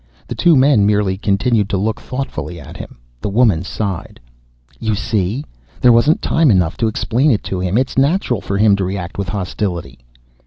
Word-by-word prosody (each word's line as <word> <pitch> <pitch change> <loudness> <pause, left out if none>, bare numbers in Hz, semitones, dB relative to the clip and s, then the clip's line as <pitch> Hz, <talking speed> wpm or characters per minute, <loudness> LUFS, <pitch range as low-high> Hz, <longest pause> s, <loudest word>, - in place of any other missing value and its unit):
The - - -5
two 170 -2 +4
men 130 -5 +4
merely 105 -2 +1
continued 100 +2 +1
to 100 - 0
look 110 +3 -2
thoughtfully 125 -9 -5
at - - -11
him. - - -9 0.2
The - - -2
woman 105 -5 +3
sighed, 95 -1 -5 0.6
"You 110 -2 -1
see? 110 +4 -2 0.3
There 125 -1 +5
wasn't 130 +8 +3
time 160 -3 +3
enough 90 -6 +2
to 115 - +1
explain 120 +6 +1
it 110 -7 +1
to 95 - -3
him. 90 +3 0
It's 130 +1 0
natural 135 - +1
for 100 +1 -3
him 105 -1 +4
to 100 - -1
react 95 0 -4
with 100 - -3
hostility." 95 - -4
105 Hz, 185 wpm, -17 LUFS, 95-125 Hz, 0.6 s, There